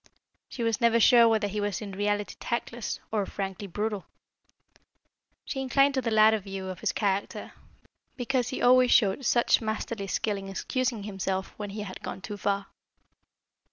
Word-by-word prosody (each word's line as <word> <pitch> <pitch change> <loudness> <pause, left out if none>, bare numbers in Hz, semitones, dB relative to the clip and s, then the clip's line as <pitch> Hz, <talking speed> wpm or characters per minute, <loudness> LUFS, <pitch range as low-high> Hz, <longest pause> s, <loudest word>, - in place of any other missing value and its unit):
She 240 - -5
was 230 +1 0
never 235 0 +4
sure 235 +1 +7
whether 220 -2 +2
he 205 +1 -3
was 205 -2 -2
in 210 -2 -7
reality 205 +1 -1
tactless, 235 -1 -3
or 210 -3 0
frankly 195 0 -5
brutal. 210 +2 -3 1.4
She 270 - -3
inclined 275 +2 +3
to 265 - 0
the 235 - -1
latter 220 0 +5
view 195 -1 -6
of 185 - -6
his - - 0
character, 200 -2 -2 0.6
because 250 -1 -1
he 260 - -4
always 255 0 +6
showed 205 +2 +3
such 240 0 +3
masterly 220 -1 -3
skill 205 +1 -1
in 195 0 -7
excusing 245 +2 -2
himself 190 -2 -3
when 210 -1 -5
he 210 +2 -6
had 195 -3 -7
gone - - -6
too 205 +1 -6
far. 200 0 -1
210 Hz, 165 wpm, -27 LUFS, 200-235 Hz, 1.4 s, sure